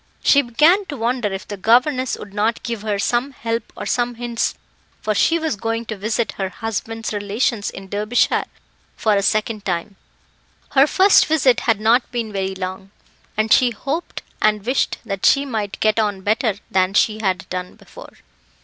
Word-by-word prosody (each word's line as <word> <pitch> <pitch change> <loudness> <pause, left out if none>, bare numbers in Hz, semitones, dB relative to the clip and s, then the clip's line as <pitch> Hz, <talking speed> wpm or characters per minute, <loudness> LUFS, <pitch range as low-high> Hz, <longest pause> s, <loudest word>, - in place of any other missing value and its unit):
She 280 - +6
began 310 - +3
to 290 - -6
wonder 235 -2 -1
if 195 0 -6
the 205 - -6
governess 255 +5 +2
would 200 -1 -11
not 215 +3 0
give 230 -3 -4
her 210 -1 -1
some 245 +6 0
help 230 -1 -4
or - - -5
some 245 0 0
hints, 235 0 -2 0.4
for 215 - -1
she 330 +10 +3
was 320 -5 -1
going 225 +2 -3
to 220 - -5
visit 215 +3 -1
her 190 -1 -1
husband's 225 +2 -4
relations 205 +1 -1
in 195 0 -10
Derbyshire 210 +4 +1 0.5
for 215 - +2
a 200 - +2
second 215 +1 0
time 185 +1 -3 0.7
her 275 +1 +5
first 385 +5 +5
visit 275 -5 +3
had 220 -2 +3
not 230 +4 +2
been 230 -3 -3
very 190 -1 -2
long 190 +1 -6 0.5
and 215 0 +3
she 250 -2 +5
hoped 275 +9 -4 0.2
and 210 -1 +2
wished 255 +3 0
that 195 -3 -5
she 275 +1 +4
might 215 -6 -4
get 215 0 +2
on 205 -3 0
better 215 +1 +1 0.2
than 185 +1 +1
she 215 0 +3
had 190 -4 -1
done 180 0 -5
before. - - -14
220 Hz, 175 wpm, -20 LUFS, 205-245 Hz, 0.7 s, She